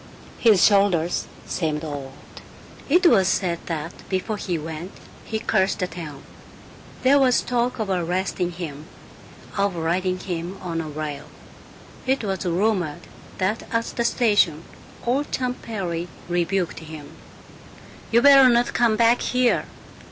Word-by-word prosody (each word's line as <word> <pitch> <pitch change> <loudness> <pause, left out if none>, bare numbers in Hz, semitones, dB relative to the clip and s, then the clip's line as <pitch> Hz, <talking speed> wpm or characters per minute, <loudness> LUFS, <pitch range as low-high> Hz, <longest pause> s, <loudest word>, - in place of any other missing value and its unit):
His 215 -6 +5
shoulders 195 -5 +2 0.2
seemed 155 -2 -2
old. 140 -3 -6 0.8
It 355 +5 +4
was 200 - +6
said 175 -3 0
that 165 0 -4 0.2
before 195 +3 -2
he 180 -4 -2
went 160 +4 -7 0.3
he 220 - -2
cursed 210 -3 +1
the 185 - -1
town. 155 -6 -8 0.8
There 275 +2 +5
was 255 -3 +4
talk 245 0 0
of 220 -3 -2
arresting 180 0 -1
him, 155 -3 -7 0.7
of 200 -2 +1
riding 180 +3 0
him 180 0 -5
on 170 -2 -3
a 160 - -6
rail. 150 -1 -5 0.8
It 265 -2 +1
was 195 -2 -2
rumored 175 -3 0 0.4
that 195 +4 0
at 230 0 +1
the 235 - 0
station 205 - +2 0.4
old 265 +5 0
Champ 250 -1 -2
Perry 175 -6 -4 0.2
rebuked 175 +1 -1
him, 155 -2 -10 1.0
"You 235 +2 +4
better 275 -2 +8
not 240 0 +2
come 235 -2 +3
back 230 +2 +4
here. 250 -1 +2
185 Hz, 135 wpm, -23 LUFS, 165-230 Hz, 1.0 s, better